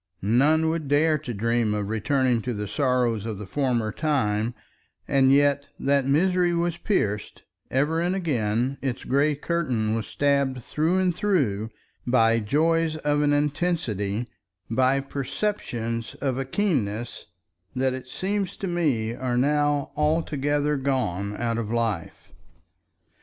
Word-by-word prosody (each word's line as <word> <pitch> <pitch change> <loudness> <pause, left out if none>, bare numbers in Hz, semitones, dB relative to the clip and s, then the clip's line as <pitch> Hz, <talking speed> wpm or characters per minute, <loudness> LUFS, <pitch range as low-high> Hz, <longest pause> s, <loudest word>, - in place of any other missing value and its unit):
None 145 +10 +3
would 160 -2 -2
dare 150 +2 +3
to 140 -4 -6
dream 115 0 0
of 105 -1 -2
returning 120 +3 +1
to 120 +1 -3
the 105 0 -4
sorrows 125 -5 0
of 110 -3 -4
the 105 - -7
former 120 -1 0
time, 120 -7 0 0.5
and 135 -1 +4
yet 140 0 +3
that 140 -1 +2
misery 175 +4 +2
was 170 0 0
pierced, 105 - -2 0.3
ever 150 +5 +1
and 180 +2 0
again 125 - -1
its 130 -3 -3
gray 145 +3 +2
curtain 135 -9 -1
was 115 -1 -2
stabbed 140 -3 0
through 160 +8 0
and 185 -2 +1
through 130 - 0 0.4
by 115 -2 +4
joys 160 +8 +1
of 145 -1 0
an 145 0 +3
intensity, 145 - -1 0.4
by 130 +3 +3
perceptions 125 - -3
of 135 -2 -2
a 135 - -2
keenness 125 - -2 0.5
that 130 0 +1
it 130 0 -7
seems 195 +5 -2
to - - -4
me 145 -11 0
are 125 0 -2
now 145 +1 +1
altogether 150 -1 +1
gone 105 -7 -1
out 115 -1 -1
of 110 -2 -4
life. 115 -7 -3
135 Hz, 135 wpm, -25 LUFS, 115-150 Hz, 0.5 s, and